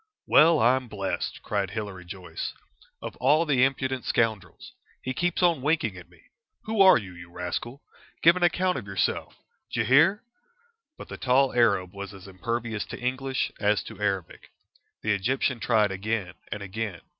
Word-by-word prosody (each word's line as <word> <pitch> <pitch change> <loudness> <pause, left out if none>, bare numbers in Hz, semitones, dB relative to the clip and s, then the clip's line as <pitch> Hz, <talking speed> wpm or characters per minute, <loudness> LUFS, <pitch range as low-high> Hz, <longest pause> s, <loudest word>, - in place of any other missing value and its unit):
"Well, 160 +2 +6
I'm 130 +1 +3
blessed!" 100 -3 -4
cried 100 -3 -1
Hilary 100 -3 -6
Joyce. 90 +1 -6 0.5
"Of - - -6
all 150 +6 +3
the 135 -5 +3
impudent 130 -1 0
scoundrels! 110 -4 -1 0.3
He 130 - -2
keeps 175 +5 -1
on 170 -6 +3
winking 140 - 0
at 90 -2 -12
me. 85 -2 -22 0.4
Who 220 -2 0
are 190 -1 +8
you, 95 -5 -7
you 85 0 -12
rascal? 90 +10 -5 0.4
Give 170 +1 +7
an 180 - -3
account 180 -1 +2
of 105 - -11
yourself! 95 -1 -1 0.4
D'ye - - 0
hear?" 160 +10 +4 0.7
But - - -10
the - - -7
tall 130 +1 +2
Arab 100 -6 +2
was 100 0 -7
as 95 0 -12
impervious 115 +3 -3
to - - -7
English 130 +1 -2
as 105 0 +2
to - - -11
Arabic. 95 -4 -3 0.5
The 110 - +1
Egyptian 125 +5 0
tried 110 -3 +2
again 95 -1 -3 0.2
and 105 - -4
again. 100 -2 -5
115 Hz, 165 wpm, -26 LUFS, 100-135 Hz, 0.7 s, are